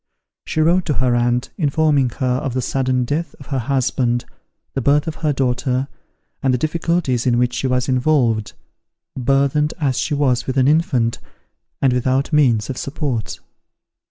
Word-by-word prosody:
She 155 - 0
wrote 175 +3 +3
to 150 - 0
her 125 -2 +1
aunt, 120 +1 0
informing 145 -3 +2
her 130 - -1
of 135 -2 -3
the 130 - 0
sudden 130 -1 0
death 155 +6 -3
of 140 - -12
her 135 - +1
husband, 120 -1 0 0.5
the 135 - -2
birth 145 +3 +3
of 160 - -5
her 155 -2 +2
daughter, 130 0 0 0.5
and 135 - +2
the 125 - +2
difficulties 155 -4 0
in 120 -1 +3
which 125 0 +1
she 135 - -1
was 125 0 0
involved, 125 -5 +1 0.6
burthened 140 +3 +1
as 135 -5 0
she 150 - -1
was 125 -4 +1
with 130 0 -2
an 130 0 +4
infant, 145 -7 +1 0.6
and 130 -2 +4
without 130 +4 0
means 120 -8 +3
of 135 - -5
support. 140 -6 -3
135 Hz, 165 wpm, -19 LUFS, 125-150 Hz, 0.6 s, an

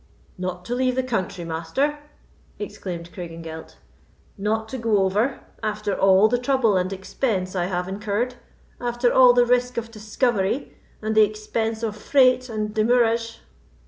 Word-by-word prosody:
"Not 180 -1 -4
to 240 - -3
leave 255 0 +1
the 260 - +1
country, 195 -7 -2
Master!" 170 - -1 0.6
exclaimed 175 -4 -6
Craigengelt. 165 -2 -8 0.6
"Not 220 +2 -1
to 260 - -5
go 225 -2 +2
over, 210 +8 0 0.2
after 210 -1 -2
all 195 +2 +5
the 245 +2 +1
trouble 250 -5 +2
and 185 0 0
expense 190 0 -2
I 175 -1 0
have 180 0 -2
incurred—after 240 +3 -3
all 250 -1 +7
the 245 0 +4
risk 250 0 +1
of 230 0 -3
discovery, 215 +2 -1 0.3
and 215 0 0
the 220 - +6
expense 220 +2 -1
of 215 -2 -2
freight 255 +2 +3
and 215 -1 -3
demurrage!" 230 0 +1
220 Hz, 145 wpm, -23 LUFS, 190-245 Hz, 0.6 s, all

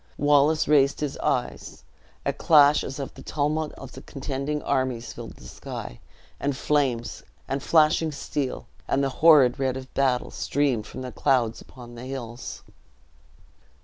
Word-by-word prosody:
Wallace 145 +2 +3
raised 140 -2 +4
his 145 -2 -2
eyes - - -2 0.4
a - - +1
clash 150 -2 +5
as 135 - -6
of 140 -2 -5
the - - -12
tumult 155 +1 -1
of 135 -2 -11 0.2
contending 140 +2 -4
armies 130 -3 -1
filled - - -9
the - - -17
sky, - - -8 0.4
and 140 -2 -1
flames, 130 -7 0 0.3
and 135 0 -2
flashing 155 +1 +3
steel, 140 -2 -4 0.2
and 140 - +1
the 135 - +1
horrid 145 -6 +6
red 130 -1 0
of 130 0 -10
battle, 130 -3 +1
streamed 135 -6 -1
from - - -8
the 125 - -6
clouds 120 -5 +1
upon 120 -2 -13
the 120 +1 -9
hills. 125 -3 -7
135 Hz, 145 wpm, -25 LUFS, 130-145 Hz, 0.4 s, horrid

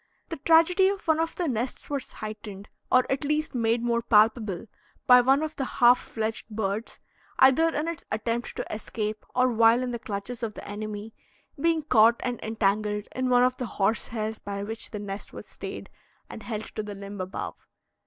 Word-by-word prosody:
The 330 - -4
tragedy 335 +6 +5
of 395 -3 -5
one 320 0 +3
of 330 0 -1
the 350 - -1
nests 245 -1 -3
was 280 -2 -4
heightened, 210 -2 -8 0.2
or 255 0 +5
at 270 - 0
least 300 +2 -1
made 230 -1 +1
more 235 -1 +1
palpable, 215 -3 +3 0.4
by 250 0 +8
one 270 +4 +3
of 310 0 -4
the 275 - -1
half 245 -1 +5
fledged 220 0 -4
birds, 210 0 -3 0.4
either 265 +5 +6
in 310 0 -2
its 335 -2 -4
attempt 230 +2 -2
to - - -3
escape 215 0 -4
or 255 0 +4
while 230 +1 +4
in 250 - -2
the 235 - -4
clutches 215 +3 -5
of 220 -3 -3
the - - -9
enemy, 210 +1 -6 0.5
being 325 +1 +2
caught 235 -4 +5
and 245 -2 -2
entangled 210 -1 0
in 255 0 0
one 245 0 +5
of 255 0 +2
the 250 - -3
horse 210 +3 +1
hairs 220 -1 -4
by 200 0 -5
which 220 +2 -4
the 215 - -6
nest 205 0 -7
was - - -8
stayed - - -8 0.4
and - - -8
held 215 -2 -6
to 215 - -1
the 210 -1 -7
limb 200 0 -7
above. 185 +1 -5
230 Hz, 195 wpm, -27 LUFS, 215-255 Hz, 0.5 s, by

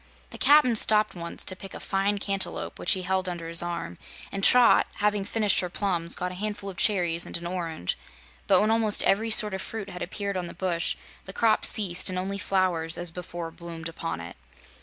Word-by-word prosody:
The - - -10
Cap'n 285 -5 +5
stopped 215 -1 +4
once 170 -1 -6
to 185 - -1
pick 195 +1 -10
a - - -7
fine 195 +1 -1
cantaloupe, 195 -1 -3
which - - +2
he 185 - -3
held 190 0 -1
under 170 -2 -6
his 165 0 +5
arm, 170 - -5 0.3
and 195 0 -5
Trot, 250 +2 +6
having 210 -1 0
finished 210 0 +1
her 180 - -2
plums, 175 -3 -2
got 180 0 -4
a 180 +2 -9
handful 205 -2 -4
of 180 - -15
cherries 175 -5 +1
and - - -1
an 170 - -9
orange; 170 - -4 0.5
but 190 - +5
when 215 +1 +2
almost 225 -2 +4
every 220 +3 +2
sort 210 -2 +4
of 190 - -3
fruit 205 -3 -6
had 180 - -8
appeared 200 +2 -3
on 180 -1 -4
the - - -10
bush, 170 -2 -1 0.3
the 190 - -8
crop 220 0 +2
ceased 190 -6 +3
and 185 - -4
only 195 +2 -3
flowers, 180 -4 0
as 175 -1 -1
before, 170 -1 -7
bloomed 165 -1 -8
upon 80 - -5
it. 85 -2 -9
185 Hz, 210 wpm, -26 LUFS, 170-205 Hz, 0.5 s, Trot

